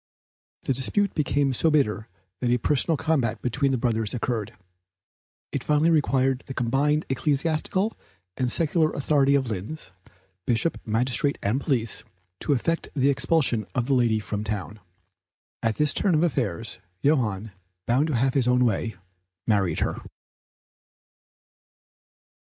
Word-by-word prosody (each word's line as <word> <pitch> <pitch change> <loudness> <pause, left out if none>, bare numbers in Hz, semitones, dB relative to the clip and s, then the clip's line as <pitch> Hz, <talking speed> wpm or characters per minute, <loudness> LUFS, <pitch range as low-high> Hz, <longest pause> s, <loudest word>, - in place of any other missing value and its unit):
The 135 - 0
dispute 200 - 0
became 145 -2 +1
so 160 +6 +3
bitter 115 -8 +1 0.3
that 125 - 0
a 120 - +3
personal 150 +5 +1
combat 130 -8 0
between 135 +3 +1
the 130 - +1
brothers 115 -2 -1
occurred. 115 -3 -3 1.0
It - - -3
finally 150 +2 +3
required 135 -4 +2
the 135 - -6
combined 140 +5 +1
ecclesiastical 155 - 0 0.4
and 125 -1 -1
secular 160 -1 +2
authority 140 -1 +2
of 130 -4 0
Linz 105 +10 -6 0.6
(bishop, 120 +7 +1
magistrate 125 +5 +1
and 115 +8 0
police), 120 -7 -1 0.4
to 145 - +1
effect 165 +6 -1
the 140 0 +3
expulsion 135 -6 +1
of 120 -2 +1
the 140 - +1
lady 120 -4 +3
from 105 -1 -4
town. 105 0 -4 0.8
At 115 -1 0
this 150 -1 +2
turn 190 -5 +2
of 155 - +3
affairs, 115 - -1 0.2
Johann, 110 -8 +1 0.3
bound 130 +6 +2
to 155 - -1
have 130 +3 +2
his 130 -4 +2
own 125 0 +4
way, 115 0 -1 0.5
married 95 -7 +1
her. - - -1
130 Hz, 135 wpm, -25 LUFS, 115-150 Hz, 1.0 s, own